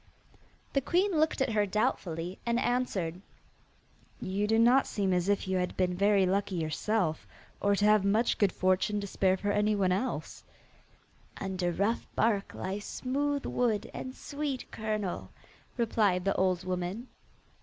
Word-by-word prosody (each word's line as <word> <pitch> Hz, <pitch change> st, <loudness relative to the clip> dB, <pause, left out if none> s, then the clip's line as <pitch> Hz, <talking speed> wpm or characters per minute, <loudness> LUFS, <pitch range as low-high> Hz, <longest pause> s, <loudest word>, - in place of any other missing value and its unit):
The 275 Hz, -, +2 dB
queen 365 Hz, +8 st, +2 dB
looked 310 Hz, -2 st, +1 dB
at 265 Hz, -, +1 dB
her 210 Hz, -1 st, +2 dB
doubtfully, 180 Hz, -3 st, -1 dB
and 235 Hz, 0 st, +1 dB
answered: 195 Hz, -9 st, -1 dB, 1.0 s
'You 200 Hz, +2 st, -1 dB
do 225 Hz, +1 st, +3 dB
not 245 Hz, +4 st, +5 dB
seem 195 Hz, -3 st, 0 dB
as 180 Hz, +1 st, +1 dB
if 205 Hz, -1 st, +1 dB
you 190 Hz, 0 st, 0 dB
had 180 Hz, 0 st, -2 dB
been 180 Hz, -1 st, +1 dB
very 200 Hz, 0 st, +3 dB
lucky 195 Hz, +1 st, 0 dB
yourself, 165 Hz, +1 st, -1 dB, 0.3 s
or 200 Hz, 0 st, +3 dB
to 205 Hz, -, +1 dB
have 210 Hz, -1 st, +5 dB
much 215 Hz, +4 st, +2 dB
good 205 Hz, -3 st, +3 dB
fortune 185 Hz, +3 st, +1 dB
to -, -, -4 dB
spare 190 Hz, -1 st, +1 dB
for 205 Hz, +1 st, -1 dB
anyone 205 Hz, -2 st, +2 dB
else.' 200 Hz, +8 st, -2 dB, 1.0 s
'Under 185 Hz, -2 st, -1 dB
rough 205 Hz, +6 st, 0 dB
bark 210 Hz, -3 st, +1 dB
lies 195 Hz, +2 st, -4 dB
smooth 285 Hz, +2 st, -2 dB
wood 230 Hz, -3 st, 0 dB
and 260 Hz, 0 st, -6 dB
sweet 285 Hz, -3 st, -4 dB
kernel,' 215 Hz, -4 st, -3 dB, 0.5 s
replied 210 Hz, -6 st, +1 dB
the 195 Hz, -, +2 dB
old 185 Hz, -1 st, +1 dB
woman. 185 Hz, +6 st, -3 dB
205 Hz, 150 wpm, -30 LUFS, 185-230 Hz, 1.0 s, not